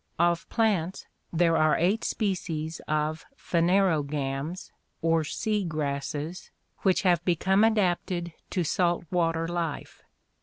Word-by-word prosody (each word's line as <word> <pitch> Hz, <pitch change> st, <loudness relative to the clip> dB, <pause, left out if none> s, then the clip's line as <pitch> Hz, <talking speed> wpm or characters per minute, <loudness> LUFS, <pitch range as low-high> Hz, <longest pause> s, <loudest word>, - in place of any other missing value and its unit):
— -, -, -40 dB
Of 170 Hz, -1 st, -6 dB
plants 200 Hz, -6 st, 0 dB, 0.3 s
there 165 Hz, 0 st, +3 dB
are 155 Hz, 0 st, +4 dB
eight 195 Hz, +6 st, +1 dB
species 165 Hz, -6 st, -2 dB
of 155 Hz, +1 st, -1 dB
phanerogams 160 Hz, -4 st, 0 dB, 0.3 s
or 165 Hz, -1 st, +3 dB
sea 210 Hz, +6 st, -1 dB
grasses 150 Hz, +1 st, -3 dB, 0.3 s
which 190 Hz, 0 st, +2 dB
have 175 Hz, -3 st, +3 dB
become 190 Hz, +4 st, +2 dB
adapted 180 Hz, -5 st, +1 dB, 0.2 s
to 180 Hz, -, 0 dB
salt 175 Hz, +1 st, +1 dB
water 165 Hz, -2 st, +1 dB
life. 170 Hz, -3 st, -4 dB
170 Hz, 115 wpm, -27 LUFS, 155-185 Hz, 0.3 s, are